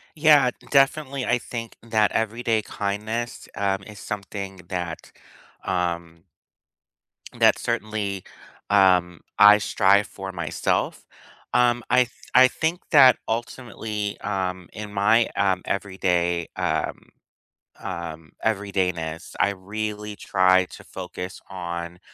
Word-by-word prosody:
Yeah. 150 -5 +5 0.2
Definitely, 140 -1 +2
I 120 - +2
think 115 -1 -7
that 110 -2 +2
everyday 115 0 0
kindness, 105 +4 -4
um, 100 -1 0
is 105 -1 -11
something 100 -1 -6
that, 90 -3 -5 0.5
um 85 -2 -2 1.1
that - - +5
certainly, 105 -4 -2 0.5
um, 90 -4 +4 0.2
I 105 0 +9
strive 100 0 +3
for 95 -1 -8
myself. 85 -4 -2 0.5
Um, 120 0 +3
I 125 - +4
th 120 - -16 0.2
I 130 +1 +8
think 160 +7 -2
that 135 -6 +8
ultimately, 110 -3 -4
um, 95 -3 -3
in 105 -1 -7
my, 110 +3 +3
um, 95 -2 +1
everyday, 90 -3 0
um, - - -1 0.8
um, 80 -2 -6
everydayness, 90 -6 -1
I 100 - +3
really 105 +2 -5
try 95 -2 +3
to - - -13
focus 90 +1 -7
on, 85 -2 -5
100 Hz, 110 wpm, -24 LUFS, 90-115 Hz, 1.1 s, I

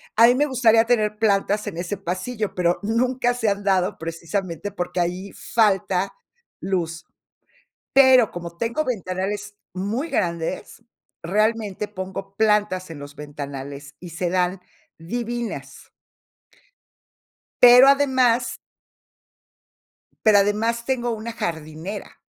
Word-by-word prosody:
A 230 +2 +7
mí 245 - +6
me 295 +3 +2
gustaría 230 -4 +4
tener 215 -3 +1
plantas 205 -1 +1
en 165 - -5
ese 180 +3 -3
pasillo, 195 +4 -4
pero 175 -1 +1
nunca 245 +3 +1
se 225 -3 -1
han 200 0 0
dado 190 -2 +1
precisamente 170 +3 -4
porque 180 -1 -3
ahí 180 +3 -2
falta 195 -4 +1 0.5
luz. 170 -3 -2 0.9
Pero 260 -4 +6
como 170 -1 -8
tengo 235 - -1
ventanales 205 -3 -3 0.2
muy 220 - -2
grandes, 170 +6 -3 0.4
realmente 210 +2 0
pongo 195 0 -7
plantas 210 -4 +1
en 155 -3 -9
los 145 +1 -10
ventanales 140 -1 -8
y 175 -1 -9
se 170 +2 -2
dan 180 0 0 0.4
divinas. 235 +6 -5 1.7
Pero 250 +2 +9
además 260 -4 +3 1.7
pero 210 -2 +6
además 225 +4 0
tengo 245 -2 0
una 225 +1 -4
jardinera. 165 +1 -6
205 Hz, 115 wpm, -23 LUFS, 175-230 Hz, 1.7 s, Pero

